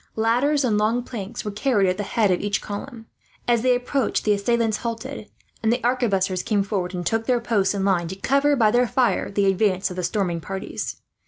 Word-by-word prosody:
Ladders 250 +6 +2
and 215 -5 +2
long 225 +3 +1
planks 220 -2 -6
were 210 - -2
carried 210 -2 +1
at 185 0 0
the - - -2
head 205 0 +1
of 180 - +1
each 205 0 0
column. 225 +3 -7 0.4
As 235 -2 +3
they 250 0 +3
approached 250 +1 -1
the 210 - +4
assailants 225 +2 +1
halted, 235 0 -5 0.3
and 225 - +2
the 240 - +1
arquebusiers 200 -7 +1
came 205 -3 +1
forward 190 -3 -3
and 175 -1 -4
took 225 +3 0
their 250 -2 +3
post 210 -4 +1
in 195 -1 -1
line, 180 -4 +1
to 190 - -5
cover 280 +8 +2
by 220 -5 +3
their 245 +1 +3
fire 250 +1 +1
the 200 0 +1
advance 195 -1 +1
of - - -6
the 180 - -2
storming 175 -3 -1
parties. 195 +2 -5
215 Hz, 215 wpm, -23 LUFS, 195-240 Hz, 0.4 s, the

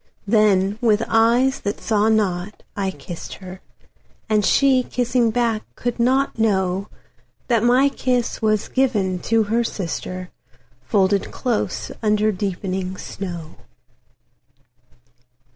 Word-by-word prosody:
Then, 205 -1 +3
with 220 -2 +3
eyes 240 +4 +3
that 205 - -3
saw 215 -1 +1
not, 205 -2 -1
I 195 -1 -1
kissed 165 0 -8
her; 185 0 -10 0.7
And 215 -2 +2
she, 265 +4 +4
kissing 245 -1 0
back, 230 -1 0
could 245 0 -3
not 260 +3 +2
knowThat 200 +3 -2
my 250 +4 +4
kiss 250 -4 -1
was 215 -1 +1
given 210 -9 0
to 225 +4 +2
her 225 +3 +1
sister, 185 -3 -5 0.5
Folded 200 -2 +1
close 240 -5 -2
under 215 0 +2
deepening 185 -1 -3
snow. 175 -6 -7
215 Hz, 110 wpm, -21 LUFS, 190-235 Hz, 0.7 s, she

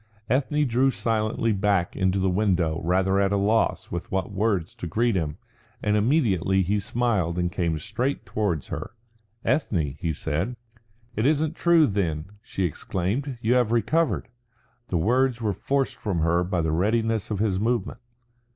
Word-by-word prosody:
Ethne 145 +3 +2
drew 130 +2 +3
silently 115 -2 0
back 100 -3 +1
into 95 0 +1
the 95 0 +1
window 90 -5 +1
rather 95 +3 +2
at 100 0 +2
a 100 - +2
loss 105 +3 +1
with 85 0 -5
what 95 +1 -1
words 100 -4 0
to 85 - -6
greet 115 +6 +1
him, 80 -5 -2 0.5
and 105 0 +2
immediately 105 - +2
he 100 +4 +1
smiled 100 -5 0
and 90 0 0
came 85 -2 -1
straight 115 - -2
towards 100 -9 -2
her. - - -5 0.5
"Ethne," 85 - 0
he 85 - -1
said. 80 +10 -2 0.6
"It 110 +5 +2
isn't 155 +1 +1
true, 170 -3 +5
then," 95 - -2
she 95 - -4
exclaimed. 100 - -2
"You 115 +2 +2
have 125 -3 +2
recovered." 120 - +1 0.6
The 90 - -1
words 125 +7 +2
were 110 -3 0
forced 135 +7 -1
from 95 -7 -1
her 85 +2 +2
by 90 -1 -1
the 80 -1 0
readiness 110 +5 +1
of 105 - -1
his 100 -2 0
movement. 115 -1 -1
100 Hz, 160 wpm, -25 LUFS, 90-120 Hz, 0.6 s, true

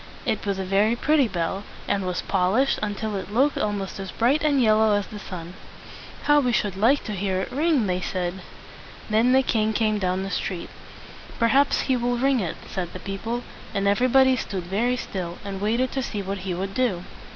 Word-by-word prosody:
It - - -1
was 200 -1 0
a 190 - -2
very 200 +4 +3
pretty 285 +1 +3
bell, 190 0 -2 0.2
and 195 -2 0
was, 180 -1 -2
pol 185 -1 +1
ished 265 +4 +2
until 210 0 -2
it 195 +1 -5
looked 270 +7 +2
almost 205 -2 -2
as 195 -1 -5
bright 260 - +1
and 290 -3 +3
yellow 220 -2 +4
as 205 -1 0
the 210 - -9
sun. 175 -3 -7 0.7
"How 295 0 +5
we 250 -4 +1
should 205 -4 0
like 235 +9 +3
to 215 - -5
hear 190 -1 -1
it 190 - -4
ring!" 295 -3 +2
they 180 -1 -1
said. 185 0 -3 0.7
Then 225 +4 +4
the 265 +1 +5
king 220 -3 +1
came 215 -1 +1
down 185 0 0
the 195 - -4
street. 180 -1 -3 0.7
"Perhaps 270 +5 +3
he 260 - +1
will 245 0 0
ring 270 +1 +2
it," 175 -6 -2
said 180 -3 -4
the 185 - -7
people; 225 +6 -4 0.3
and 200 0 +1
everybody 255 +5 +4
stood 195 -6 -4
very 225 +8 0
still, 180 -6 -5
and 195 -1 -5
waited 235 +5 +1
to 270 - -1
see 210 -5 -4
what 195 +1 -4
he 185 0 -3
would 195 +2 -4
do. 230 -9 0
210 Hz, 205 wpm, -24 LUFS, 190-245 Hz, 0.7 s, How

